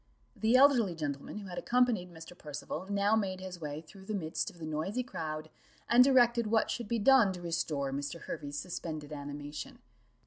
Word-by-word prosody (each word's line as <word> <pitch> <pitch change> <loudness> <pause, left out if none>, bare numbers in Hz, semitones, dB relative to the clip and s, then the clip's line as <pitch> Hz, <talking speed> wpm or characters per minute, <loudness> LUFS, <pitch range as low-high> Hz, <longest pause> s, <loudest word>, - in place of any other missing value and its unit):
The 220 +3 +2
elderly 255 -9 +5
gentleman 145 +2 -4
who 205 -2 -7
had 175 - -4
accompanied 240 -7 +2
Mr. 165 +1 -11
Percival 150 +3 -6
now 200 +1 +3
made 190 -4 -1
his 185 -2 -8
way 150 0 -4
through 190 +4 -15
the 215 - -2
midst 160 -5 -2
of - - -16
the 165 - -7
noisy 160 +11 -2
crowd, 155 -9 -5 0.4
and 245 +1 +7
directed 240 -3 +4
what 220 +1 +2
should 235 -3 -3
be 235 - 0
done 230 -2 +6
to 180 - -8
restore 155 -5 -1
Mr. 145 +4 -4
Hervey's 145 -2 -5
suspended 155 -2 -5
animation. 145 0 -6
180 Hz, 180 wpm, -32 LUFS, 155-220 Hz, 0.4 s, and